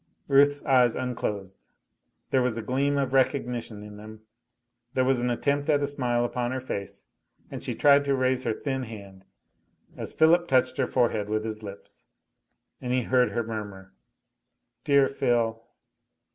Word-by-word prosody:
Ruth's 145 +1 +4
eyes 125 -3 +4
unclosed, 105 -6 -4 0.6
there 130 - +3
was 125 -2 0
a 115 - -4
gleam 140 +5 0
of 135 -2 -1
recognition 125 -5 0
in 105 0 -11
them, 110 +1 -11 0.7
there 130 - +2
was 130 -1 +2
an 125 0 0
attempt 140 +4 0
at 145 -1 +3
a - - +3
smile 125 -4 -1
upon 120 0 -2
her 130 +1 -2
face, 100 -6 -6 0.5
and - - -6
she - - -3
tried 140 -1 +5
to 140 -1 +2
raise 130 -1 +1
her 115 - 0
thin 130 +3 -3
hand, 100 -5 -10 0.7
as - - -6
Philip 170 +2 +4
touched 130 -1 +2
her - - +1
forehead 110 -5 0
with 110 0 -1
his 110 -1 -5
lips; 100 -2 -11 0.8
and 125 - -3
he 125 0 +1
heard 125 +1 +3
her 120 - 0
murmur, 100 -4 -7 0.9
"Dear 140 -1 +4
Phil." 115 -4 0
125 Hz, 160 wpm, -26 LUFS, 110-135 Hz, 0.9 s, tried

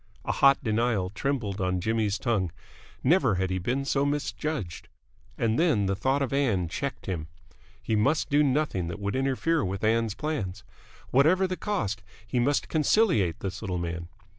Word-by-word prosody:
A - - 0
hot 140 +1 +4
denial 110 -4 0
trembled 105 -5 -2
on 90 0 0
Jimmy's 110 +1 0
tongue. 105 -8 0 0.5
Never 135 - +4
had 95 0 -1
he 95 - 0
been 125 +9 -1
so 140 0 +1
misjudged. 145 - -3 0.5
And 115 0 +1
then 150 - +3
the 95 0 0
thought 135 +7 +1
of 135 - -3
Ann 115 -11 +1
checked 140 +11 -4
him. 85 -5 -3 0.5
He 110 - -1
must 140 +9 +1
do 145 +1 +5
nothing 140 - +1
that 85 - -5
would 100 +2 -2
interfere 135 +4 +1
with 95 +2 -3
Ann's 110 -1 +2
plans. 105 -11 -3 0.5
Whatever 160 +9 +4
the 185 0 -2
cost, 120 - -2 0.2
he 120 +2 -1
must 140 +4 +1
conciliate 155 - +2
this 95 0 -4
little 95 -5 -2
man. 85 0 -4
115 Hz, 165 wpm, -27 LUFS, 95-140 Hz, 0.5 s, do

